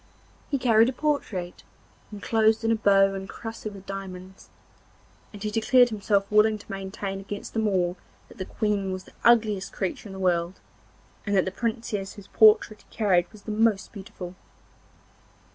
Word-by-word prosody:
He 280 - +1
carried 230 -2 +4
a - - -4
portrait, 235 -11 -2 0.5
enclosed 220 +2 +1
in 225 - +2
a - - +4
bow 195 -2 +4
encrusted 210 +2 -7
with 195 -1 -12
diamonds, 190 -1 -8 0.8
and 205 -1 -10
he 210 - -2
declared 245 +3 +4
himself 205 -2 0
willing 215 +1 +4
to 205 - -13
maintain 195 0 -5
against 200 +1 -7
them 220 -1 0
all 180 -2 0 0.3
that - - -17
the 185 - -3
Queen 205 -2 -1
was 185 0 -5
the - - -18
ugliest 215 -5 +3
creature 195 +2 -4
in - - -9
the - - -8
world, 175 -1 0 0.6
and 200 -1 -1
that 190 - +3
the 190 - -3
Princess 220 -2 -3
whose 205 - -12
portrait 215 0 +4
he - - -28
carried 185 -5 +2
was 215 -2 -16
the 215 - -5
most 215 -2 +1
beautiful. 185 -3 -9
205 Hz, 165 wpm, -26 LUFS, 190-220 Hz, 0.8 s, carried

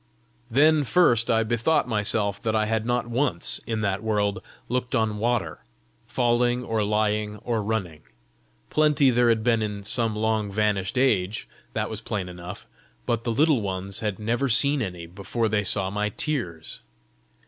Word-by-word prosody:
Then 150 +5 +4
first 120 -6 +3
I 115 0 +3
bethought 120 +6 +1
myself 105 -2 +1
that 110 -1 -1
I 110 0 +2
had 110 +1 -1
not 120 0 0
once, 120 -6 -1
in 110 -1 -2
that 100 -1 -1
world, 105 -3 0 0.3
looked 125 +1 -2
on 110 -3 0
water, 110 -9 -1 0.5
falling 120 0 +1
or 115 -3 -1
lying 105 0 0
or 115 -2 -1
running. 100 -8 -3 0.7
Plenty 150 -3 +4
there 120 0 +3
had 110 -1 +2
been 115 -1 +2
in 105 -2 -4
some 115 +1 +2
long 110 -1 0
vanished 105 0 0
age 110 -6 +1 0.3
that - - -1
was - - -6
plain 95 -4 -4
enough 90 0 -9 0.4
but 115 -1 -1
the 120 - 0
Little 145 +1 +3
Ones 95 0 -3
had 105 -3 -2
never 120 +5 -1
seen 140 +4 +3
any 90 -6 -5
before 100 +6 -3
they 105 -1 +1
saw 95 -1 +1
my 105 +1 -1
tears! 95 - -3
110 Hz, 160 wpm, -25 LUFS, 100-120 Hz, 0.7 s, Then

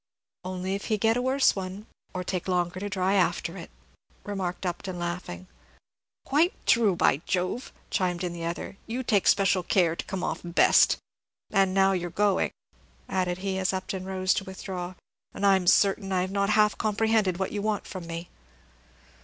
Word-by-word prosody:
"Only 185 +1 -3
if 200 - -4
he 215 - +1
get 225 +2 +2
a 245 - 0
worse 260 +2 +3
one, 190 +2 -6 0.3
or 185 - -4
take 185 0 -3
longer 180 0 0
to 205 +1 -4
dry 190 0 0
after 190 -3 +1
it," - - -8 0.5
remarked 190 -3 -4
Upton, 180 +1 -4
laughing. 175 +1 -5 0.8
"Quite 315 +6 +3
true, 220 -6 +4
by 150 - +3
Jove!" 185 +7 -1 0.2
chimed 180 -1 0
in 175 -1 -2
the 170 -1 -6
other; 170 +3 -4
"you 245 +3 -3
take 205 -5 +2
special 195 -2 +4
care 175 -2 +2
to - - -5
come 190 -2 -4
off - - -2
best. 170 -1 +4 0.5
And 195 -2 +2
now 195 0 +5
you 180 -2 -1
're 170 - -13
going," 205 -2 +2 0.6
added 180 -2 -1
he, 190 -1 -1
as 190 +1 0
Upton 185 0 -4
rose 185 -1 +1
to - - -2
withdraw, 185 -1 -6 0.4
"and 200 - -1
I'm 190 -2 +4
certain 195 +1 +4
that 190 - 0
I - - +2
have 185 +1 -2
not 200 0 +1
half 210 0 +3
comprehended 215 -3 +1
what 190 0 -2
you 205 - -3
want 210 -1 -1
from 180 -3 -7
me." 170 +1 -6
190 Hz, 185 wpm, -27 LUFS, 180-205 Hz, 0.8 s, now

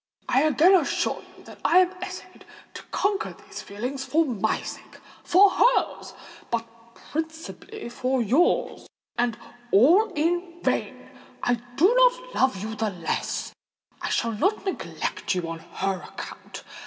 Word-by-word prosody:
I 260 - +3
again 310 +5 +5
assure 345 -7 +1 0.2
you - - -16
that - - -13
I 345 - +4
have 370 0 +4
essayed - - -8 0.3
to - - -8
conquer 405 +1 -1
these - - -10
feelings, 250 +7 -5
for 320 +4 +2
my 220 -5 0
sake—for 390 +3 +1
hers—but 235 - 0 0.5
principally 320 - -5
for 255 +2 -1
yours,—and 240 - 0 0.3
all 345 - +5
in 345 +3 -1
vain! - - -1 0.4
I 245 - +3 0.2
do 365 - +5
not - - +3
love 255 -7 +1
you 220 +1 -4
the 220 0 -1
less—I 175 -4 -5
shall 230 - 0
not 380 - 0
neglect 380 - -3
you 175 -2 -2
on 165 0 -5
her 190 +2 -3
account. - - -9
300 Hz, 130 wpm, -25 LUFS, 230-370 Hz, 0.5 s, again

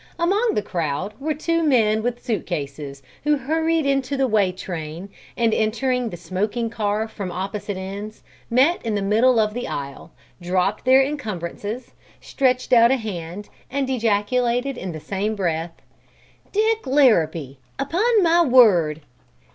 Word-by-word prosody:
Among 405 +7 +1
the 210 - 0
crowd 170 +1 -3
were 305 +2 -2
two 330 +2 0
men 225 -8 +3
with 245 +2 -3
suit 230 -4 -2
cases 140 -4 -5 0.2
who 295 0 +2
hurried 320 +3 0
into 275 0 0
the 270 - +2
way 210 -6 +2
train 175 0 -7 0.3
and, 230 -2 +2
entering 245 +2 0
the 175 - -7
smoking 205 +7 -2
car 215 0 -1
from 200 -4 -6
opposite 200 +2 -4
ends, 200 +3 -7 0.3
met 270 +9 +3
in 225 -2 -1
the 200 - -1
middle 225 +4 +3
of 215 -1 +1
the 245 +2 -4
aisle, 140 +2 -6 0.3
dropped 185 +5 0
their 260 +1 +6
encumbrances, 220 - -5 0.3
stretched 255 -2 0
out 235 -1 +7
a 265 - +3
hand 200 -3 -6 0.2
and 270 0 -1
ejaculated 240 +3 0
in 185 -6 -5
the 160 - -7
same 200 +6 -2
breath: 170 -3 -3 0.7
"Dick 440 -3 +1
Larrabee, 165 - +2 0.2
upon 395 - +2
my 340 0 +4
word!" 195 - +5
220 Hz, 145 wpm, -22 LUFS, 185-265 Hz, 0.7 s, out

